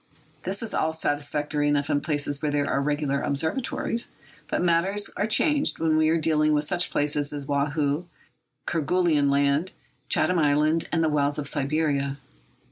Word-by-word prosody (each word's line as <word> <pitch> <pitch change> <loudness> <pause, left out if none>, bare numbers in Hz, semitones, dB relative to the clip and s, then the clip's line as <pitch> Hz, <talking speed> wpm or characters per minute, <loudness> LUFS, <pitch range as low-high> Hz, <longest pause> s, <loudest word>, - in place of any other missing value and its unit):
This 195 +4 -2
is 225 - -3
all 160 0 0
satisfactory 145 -1 -1
enough 145 -1 +1
in 145 - 0
places 145 -2 -1
where 150 - 0
there 145 -1 0
are 135 - 0
regular 145 -1 -1
observatories. 165 - -2 0.3
But - - -1
matters 185 +4 +2
are 210 - 0
changed 295 +6 +2
when 160 -1 +1
we 155 0 +3
are 165 - +3
dealing 155 -1 +2
with 150 0 +1
such 180 +2 +1
places 145 0 +1
as 145 -1 -6
Woahoo, 145 +2 -1 0.6
Kerguelen 165 -3 +1
Land, 140 +5 +1 0.4
Chatham 180 -1 +2
Island, 155 +2 +2
and 165 -1 +1
the 160 - +2
wilds 145 -1 +1
of 145 -2 -3
Siberia. 140 -1 0
150 Hz, 160 wpm, -25 LUFS, 145-165 Hz, 0.6 s, we